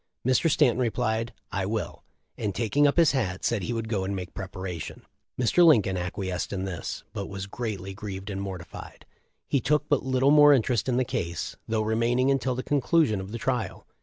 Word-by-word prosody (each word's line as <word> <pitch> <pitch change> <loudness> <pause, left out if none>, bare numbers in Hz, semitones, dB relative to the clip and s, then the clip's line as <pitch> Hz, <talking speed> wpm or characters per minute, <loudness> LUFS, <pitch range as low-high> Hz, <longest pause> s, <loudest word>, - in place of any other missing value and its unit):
Mr. 130 +6 +3
Stanton 140 -6 +3
replied, 115 -1 0 0.2
T 95 - 0
will/ 110 0 -3 0.3
and 105 -3 -3
taking 140 +6 +3
up 145 - 0
his 165 -3 +6
hat, 95 -9 -2
said 115 -4 +1
he 100 - -3
would 115 -1 -3
go 105 -4 -1
and 100 +1 -2
make 90 -1 -6
preparation. 95 -3 -6 0.3
Mr. 125 +8 +4
Lin 155 - +7
coln 95 0 -2
acquiesced 90 0 -3
in 95 -1 -2
this, 90 -4 -5
but 100 - -4
was 95 -1 -5
greatly 100 -3 -5
grieved 100 0 -6
and 95 0 -4
mortified; 95 -5 -8 0.4
he 140 - +1
took 150 +4 +1
but 145 - +3
little 130 +1 +3
more 145 -1 +8
interes 120 -3 +1
in 125 -1 +1
the 130 - +2
case, 85 -6 -3
though 110 -1 0
remaining 120 +4 +2
until 135 -2 0
the 130 - -3
conclusion 145 - +2
of 95 +1 -8
the 115 - -4
trial. 120 -5 -2
110 Hz, 195 wpm, -27 LUFS, 95-130 Hz, 0.4 s, more